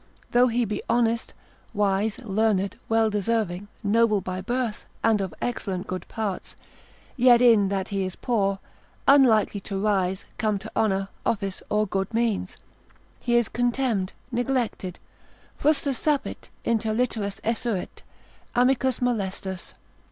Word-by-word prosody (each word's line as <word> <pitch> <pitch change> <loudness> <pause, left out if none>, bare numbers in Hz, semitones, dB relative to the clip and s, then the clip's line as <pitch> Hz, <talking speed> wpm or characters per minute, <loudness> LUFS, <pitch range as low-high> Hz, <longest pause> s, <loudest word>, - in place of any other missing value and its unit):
Though 245 +1 +5
he 240 0 +1
be 210 -2 -3
honest, 230 0 +1 0.4
wise, 205 +1 +1
learned, 205 -3 0
well 225 -1 +3
deserving, 205 -2 -1 0.2
noble 215 0 +3
by 185 0 -4
birth, 240 +1 -2 0.2
and 225 -2 +3
of 190 -3 -3
excellent 195 -6 -2
good 185 -1 -5
parts; 215 -5 -4 0.6
yet 245 -2 +6
in 225 -5 +5
that 195 -1 -2
he 195 -1 -1
is 185 0 -4
poor, 200 -5 0 0.5
unlikely 240 -7 +5
to 195 0 -5
rise, 190 -2 0
come 215 -3 +1
to 205 +3 -9
honour, 195 -2 +1
office, 195 -3 -1
or 210 0 +2
good 195 +2 -2
means, 225 -5 0 0.6
he 240 -1 0
is 240 -1 +4
contemned, 240 -5 0 0.2
neglected, 240 -7 -1 0.6
frustra 290 -2 +2
sapit, 290 +3 -1 0.2
inter 225 -1 +1
literas 220 -5 -1
esurit, 225 -3 -2 0.5
amicus 255 +1 +2
molestus. 195 -6 -2
215 Hz, 130 wpm, -25 LUFS, 195-240 Hz, 0.6 s, yet